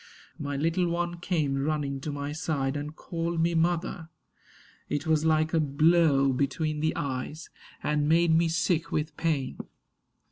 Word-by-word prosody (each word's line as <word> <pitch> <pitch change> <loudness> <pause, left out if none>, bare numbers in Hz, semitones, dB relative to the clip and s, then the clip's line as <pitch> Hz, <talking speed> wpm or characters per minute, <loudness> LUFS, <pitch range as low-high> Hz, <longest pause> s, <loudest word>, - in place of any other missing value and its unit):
My 145 -1 -3
little 165 +4 +1
one 175 0 -2
came 150 -6 0
running 145 -2 -1
to 150 - -4
my 145 0 -4
side 150 -3 -1
And 150 +1 -5
called 170 0 -3
me 170 +1 +2
Mother. 165 0 0 0.8
It 145 +2 -2
was 160 -1 +2
like 155 0 +2
a 165 - +4
blow 150 -2 +3
Between 150 +3 -1
the 155 +2 0
eyes; 145 0 -4 0.3
and 150 0 +1
made 165 0 +4
me 165 +1 +3
sick 165 0 0
with 155 +1 -2
pain. 150 -6 -1
155 Hz, 150 wpm, -28 LUFS, 145-165 Hz, 0.8 s, a